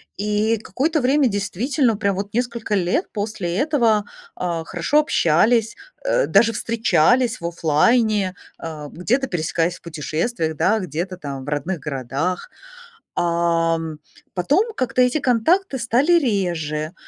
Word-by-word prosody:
И 210 +2 +1
какое-то 305 +8 -1
время 270 +2 +3
действительно 220 - 0
прям 200 -2 0
вот 200 +1 -5
несколько 235 -2 -2
лет 190 - 0
после 205 -5 -3
этого, 235 -7 +2 0.3
а, 170 -2 -2
хорошо 295 - +1
общались, 225 - +2 0.3
э, - - +2
даже 230 0 +4
встречались 230 +1 +2
в 170 - -2
оффлайне, 190 +5 +2 0.2
а, 155 -3 -7
где-то 245 - -1
пересекаясь 165 -2 -1
в - - -16
путешествиях, 160 - -3
да, 220 +8 +2
где-то 180 0 -4
там 140 -5 -6
в 145 - -7
родных 150 +5 -2
городах. 145 - -3 0.7
Ам. 165 -2 0 0.4
Потом 350 - +1
как-то 255 - 0
эти 250 +5 +3
контакты 280 - +2
стали 255 +7 +2
реже. 175 - 0
205 Hz, 125 wpm, -21 LUFS, 165-245 Hz, 0.7 s, даже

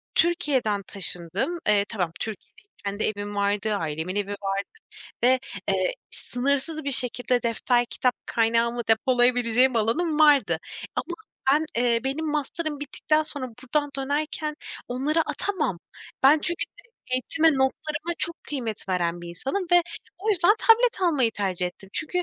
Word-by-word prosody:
Türkiye'den 285 -12 +2
taşındım. 195 - -3
Eee, 205 -1 +4
tamam; 180 -7 -1
Türkiye'de 215 -1 -6 0.2
kendi 200 +2 -2
evim 205 -1 -3
vardı, 205 +1 +1
ailemin 160 +1 -3
evi 205 -1 -1
vardı 200 -1 -2 0.7
ve 255 +1 +5 0.3
eee, - - +1 0.2
sınırsız 280 +4 -1
bir 280 - -1
şekilde 250 -1 +1
defter, 240 +1 +1
kitap 250 +1 0
kaynağımı 230 +1 +1
depolayabileceğim 245 +1 +4
alanım 300 +9 +1
vardı. 275 - +5 0.4
Ama - - -1 0.5
ben, 305 +2 +3 0.2
eee, 235 -1 +2
benim 285 +4 -2
masterım 300 +1 -2
bittikten 305 +2 0
sonra, 290 -4 -4 0.2
buradan 290 +3 0
dönerken, 300 +2 -2 0.3
onları 275 +6 0
atamam. 310 - -1 0.4
Ben, 285 +4 +7
çünkü 340 +2 -2 0.5
eğitime, 310 +6 +2
notlarıma 300 +4 -1
çok 335 -1 -4
kıymet 235 -9 -5
veren 175 -2 0
bir 175 - -7
insanım 270 - -3
ve 350 0 +7 0.4
o 410 +4 -4
yüzden 390 -1 +5
tablet 460 -2 +4
almayı 290 -10 +3
tercih 185 -4 -1
ettim. 185 +2 -10
Çünkü 360 +3 0
255 Hz, 135 wpm, -25 LUFS, 210-305 Hz, 0.7 s, Ben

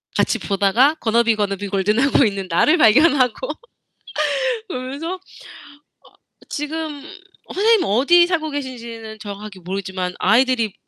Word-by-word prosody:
같이 - - +1
보다가 205 +9 +2
Gonna 235 +1 +2
be, 230 -1 +2
gonna 200 -2 -1
be 205 +1 -5
golden 200 +3 0
하고 275 +1 +3
있는 200 -4 -1
나를 295 - +3
발견하고. 285 - +3 1.2
그러면서 280 +3 -5
어 - - -9 1.3
지금 295 0 -5 0.5
선생님 435 +1 +3
어디 285 - +4
살고 325 -3 -1
계신지는 235 -6 -7
정확하게 205 -1 -9
모르겠지만 185 0 -4
아이들이 230 0 +2
235 Hz, 365 characters per minute, -20 LUFS, 205-295 Hz, 1.3 s, 어디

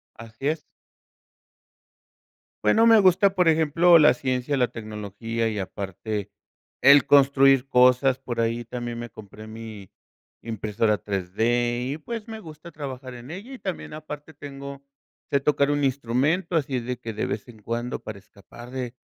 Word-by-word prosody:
Así 115 +5 -6
es. 155 0 -1 2.0
Bueno, 225 +1 +4
me 225 -1 +7
gusta, 190 +1 +4
por 180 -2 +4
ejemplo, 165 +2 +5
la 150 - +6
ciencia, 130 +2 -1
la 125 -2 +3
tecnología 110 0 -4
y, 105 -2 -3
aparte, 100 +2 -5 0.5
el 140 +2 +7
construir 135 -1 +5
cosas. 125 +1 +4
Por 120 -3 -4
ahí, 115 +1 -1
también 120 0 -5
me 120 -1 -7
compré 110 0 -12
mi 110 -3 -10 0.5
impresora 110 -1 -1
3D, 120 +6 -1
y 150 - -5
pues, 225 +7 -6
me 220 -1 -8
gusta 160 -1 -12
trabajar 130 -4 -7
en 120 +4 -11
ella. 205 +10 -8
Y 260 - -9
también, 185 -5 -5
aparte, 150 0 -9
tengo 140 -1 -9 0.5
sé 140 - +3
tocar 140 0 +2
un 145 -1 +1
instrumento, 140 +7 0
así 135 -4 0
de 125 +1 -5
que, 115 -2 -6
de 105 - -2
vez 105 - -4
en 110 -3 -14
cuando, 120 +3 -3
para 110 -2 -8
escapar 110 +5 -14
de, 125 -2 -5
125 Hz, 155 wpm, -24 LUFS, 115-145 Hz, 2.0 s, me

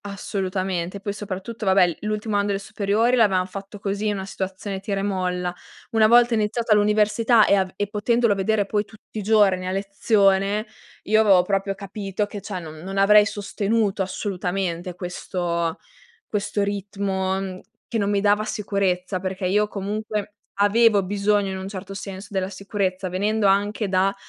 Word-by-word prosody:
Assolutamente, 190 -2 -3
poi 200 0 -4
soprattutto 205 +2 -6
vabbè, 185 -3 +4
l'ultimo 210 0 -2
anno 205 0 +2
delle 200 -1 0
superiori 210 +4 +1
l'avevamo 195 -6 +3
fatto 195 +2 -8
così, 205 +1 -2
una 195 -2 -3
situazione 190 +1 -5
tira 195 0 -2
e - - -3
molla. 180 -2 -1 0.4
Una 220 -2 +5
volta 240 +1 +5
iniziata 220 +1 +1
l'università 210 +2 +4
e - - +3
av 190 -2 +2
e 205 - -1
potendolo 230 +2 +2
vedere 200 +1 +1
poi 205 +1 0
tutti 215 0 -11
i - - -3
giorni 200 -3 +3
a - - -1
lezione 195 +1 +2 0.4
io 215 +1 +3
avevo 195 -4 +5
proprio 195 +1 -1
capito 200 0 -4
che 205 0 -8
cioè 195 -2 -5
non 160 -2 -9
non 190 +4 -6
avrei 205 +1 +6
sostenuto 205 0 -1
assolutamente 185 -2 -3
questo 175 -2 -3 0.5
questo 205 0 -1
ritmo, 195 -1 -2
mhmm, 190 -1 -5 0.3
che 230 - -2
non 200 -1 0
mi 200 -1 +1
dava 205 +1 +3
sicurezza, 195 -3 -1
perché 185 0 -4
io 210 +3 +2
comunque 210 +1 -4 0.3
avevo 210 0 +5
bisogno 205 +1 +1
in 190 - -4
un 190 0 -6
certo 195 0 -7
senso 195 0 -7
della 190 -1 -1
sicurezza, 195 -1 -2
venendo 205 +3 +1
anche 205 +2 +1
da 190 +1 +2
200 Hz, 160 wpm, -23 LUFS, 190-210 Hz, 0.5 s, avrei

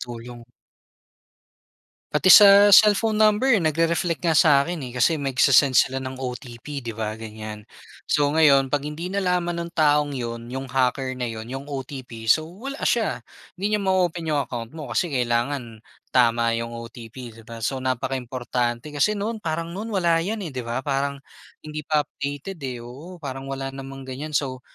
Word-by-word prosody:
tulong. 120 0 -8 1.7
Pati 185 - +3
sa 205 -1 +8 0.3
cellphone 215 +1 +2
number 215 +5 +4
nagre-reflect 165 +2 0
nga 165 - +3
sa 155 - +4
akin, 175 -2 -4
eh, - - -7
kasi 125 - +4
nagsi-send 135 -1 +4
sila 130 +1 -4
ng 130 0 -6
OTP, 125 -1 -10 0.2
di - - -2
ba? 110 - -1
Ganyan. 110 -1 -7 0.6
So 150 - +2
ngayon, 140 -4 +5
'pag 145 - +1
hindi 150 +3 -6
nalaman 180 -3 0
ng 170 - -7
taong 150 -1 +3
yun, 115 0 -5
yung 135 0 -4
hacker 130 0 +1
na 125 -1 -3
yun, 110 0 -7
yung 135 +1 -6
OTP, 130 -1 -8 0.2
so 155 - -3 0.2
wala 275 +1 -5
siya, 230 -3 +1 0.5
hindi 195 +2 -3
niya 210 - -3
ma-o-open 180 -3 0
yung 145 - +1
account 115 -2 -6
mo 155 -3 -7
kasi - - +1
kailangan 120 -1 -1 0.3
tama 115 -2 +3
yung 115 0 -5
OTP, 115 0 -10 0.2
di - - -12
ba? 115 -1 -9
So 135 - -1
napaka-importante. 125 0 -2
Kasi 150 +9 +2
noon, 220 +2 -3
parang 165 -2 -3
noon 210 +5 -5
wala 170 -3 +2
yan, 205 +5 -3
eh, 160 - -5
di 130 - -4
ba? 120 +2 -4
Parang 140 0 -1 0.5
hindi 155 0 -5
pa 150 -1 +2
updated, 145 +6 -6
eh, 125 - -4
oo. 150 +10 -10
Parang 135 0 -6
wala 135 0 -4
namang 135 0 -9
ganyan, 140 +4 -7
so 130 -3 -2
135 Hz, 170 wpm, -23 LUFS, 125-170 Hz, 1.7 s, sa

